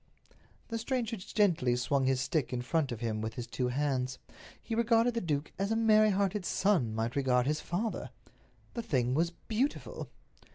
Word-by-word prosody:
The 230 Hz, -1 st, -2 dB
stranger 235 Hz, -1 st, -1 dB
gently 185 Hz, -, +1 dB
swung 135 Hz, +2 st, +1 dB
his 130 Hz, -1 st, +2 dB
stick 145 Hz, +1 st, 0 dB
in 125 Hz, -1 st, -2 dB
front 150 Hz, 0 st, 0 dB
of 120 Hz, -1 st, -5 dB
him 110 Hz, -2 st, -1 dB
with 110 Hz, 0 st, -4 dB
his 120 Hz, -, -4 dB
two 125 Hz, +1 st, -2 dB
hands. 130 Hz, -1 st, -1 dB, 0.4 s
He -, -, -6 dB
regarded 230 Hz, +1 st, +3 dB
the 230 Hz, -, -1 dB
duke 150 Hz, -3 st, -2 dB
as 195 Hz, +1 st, 0 dB
a 225 Hz, -, +1 dB
merry 215 Hz, -1 st, +5 dB
hearted 200 Hz, 0 st, +1 dB
son 175 Hz, -, +1 dB
might 115 Hz, +2 st, -2 dB
regard 125 Hz, -3 st, +2 dB
his 150 Hz, +2 st, 0 dB
father. 210 Hz, +6 st, -2 dB, 0.6 s
The 235 Hz, -, -3 dB
thing 125 Hz, -, 0 dB
was 165 Hz, +4 st, +2 dB
beautiful! 225 Hz, +10 st, -3 dB
155 Hz, 175 wpm, -31 LUFS, -, 0.6 s, merry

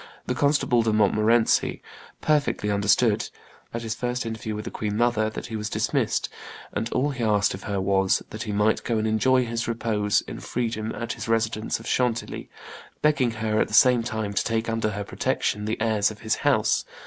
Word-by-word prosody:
the -, -, -1 dB
Constable 140 Hz, -3 st, +2 dB
de 115 Hz, -1 st, +1 dB
Montmorency, 110 Hz, +2 st, +3 dB, 0.4 s
perfectly 145 Hz, -8 st, +1 dB
understood, 105 Hz, +2 st, +2 dB, 0.4 s
at 115 Hz, 0 st, -4 dB
his 110 Hz, -1 st, -2 dB
first 125 Hz, +1 st, -3 dB
interview 110 Hz, -1 st, -4 dB
with 105 Hz, -, -6 dB
the -, -, -5 dB
queen 105 Hz, -1 st, -3 dB
mother, 115 Hz, -2 st, +2 dB
that 110 Hz, -, -7 dB
he 110 Hz, -, -6 dB
was 105 Hz, 0 st, -3 dB
dismissed, -, -, 0 dB, 0.5 s
and 115 Hz, -, -2 dB
all 140 Hz, +3 st, +1 dB
he 130 Hz, -4 st, -4 dB
asked 105 Hz, -2 st, +2 dB
of 95 Hz, -, -8 dB
her 100 Hz, -2 st, -1 dB
was, 95 Hz, 0 st, +2 dB
that 110 Hz, -, -6 dB
he 110 Hz, -, -3 dB
might 105 Hz, +1 st, +2 dB
go 115 Hz, -, 0 dB
and 110 Hz, 0 st, 0 dB
enjoy 125 Hz, +4 st, +3 dB
his 115 Hz, 0 st, -3 dB
repose 110 Hz, -3 st, +1 dB
in -, -, -8 dB
freedom 115 Hz, -2 st, -3 dB
at 115 Hz, 0 st, -3 dB
his -, -, -7 dB
residence 115 Hz, -1 st, 0 dB
of 115 Hz, -, -12 dB
Chantilly, 120 Hz, -2 st, -1 dB, 0.5 s
begging 145 Hz, -5 st, +3 dB
her 110 Hz, -1 st, 0 dB
at -, -, +1 dB
the 105 Hz, -, -2 dB
same 125 Hz, -1 st, +6 dB
time 110 Hz, -3 st, -3 dB
to -, -, +1 dB
take 115 Hz, 0 st, -1 dB
under 115 Hz, -1 st, 0 dB
her 105 Hz, 0 st, -4 dB
protection 105 Hz, +1 st, -1 dB
the 110 Hz, -, -2 dB
heirs 110 Hz, -2 st, +2 dB
of 110 Hz, -1 st, -10 dB
his 110 Hz, -1 st, 0 dB
house. 110 Hz, -7 st, +2 dB
110 Hz, 195 wpm, -25 LUFS, 105-120 Hz, 0.5 s, same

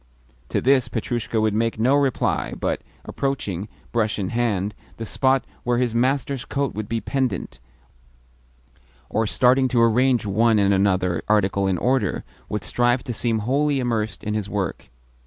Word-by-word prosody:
To -, -, 0 dB
this 130 Hz, -2 st, +3 dB
Petrushka 115 Hz, 0 st, -2 dB
would 110 Hz, -1 st, +1 dB
make 115 Hz, +1 st, 0 dB
no 120 Hz, +5 st, +3 dB
reply, 140 Hz, -3 st, +1 dB
but, -, -, -1 dB, 0.2 s
approaching, 105 Hz, -9 st, -3 dB, 0.2 s
brush 110 Hz, -2 st, 0 dB
in 95 Hz, -3 st, -2 dB
hand, 105 Hz, -4 st, 0 dB, 0.2 s
the 115 Hz, -, -5 dB
spot 130 Hz, +3 st, +1 dB, 0.2 s
where 120 Hz, 0 st, +1 dB
his 120 Hz, -2 st, 0 dB
master's 130 Hz, +1 st, 0 dB
coat 140 Hz, -1 st, -2 dB
would 105 Hz, -1 st, -5 dB
be 115 Hz, -, 0 dB
pendent, 130 Hz, -, -2 dB, 1.5 s
or 110 Hz, +1 st, +1 dB
starting 130 Hz, +3 st, +4 dB
to 125 Hz, -1 st, +1 dB
arrange 120 Hz, 0 st, +3 dB
one 110 Hz, +3 st, +3 dB
and 100 Hz, -1 st, +3 dB
another 95 Hz, -3 st, +1 dB
article 100 Hz, -2 st, +2 dB
in 95 Hz, -2 st, +1 dB
order, 125 Hz, -2 st, 0 dB, 0.3 s
would 105 Hz, -3 st, -3 dB
strive 120 Hz, +5 st, +1 dB
to 125 Hz, -, -4 dB
seem 115 Hz, 0 st, 0 dB
wholly 140 Hz, +2 st, +1 dB
immersed 115 Hz, -4 st, -2 dB
in 105 Hz, -, -2 dB
his 105 Hz, -2 st, -2 dB
work. 100 Hz, -4 st, -3 dB
115 Hz, 155 wpm, -23 LUFS, 105-130 Hz, 1.5 s, starting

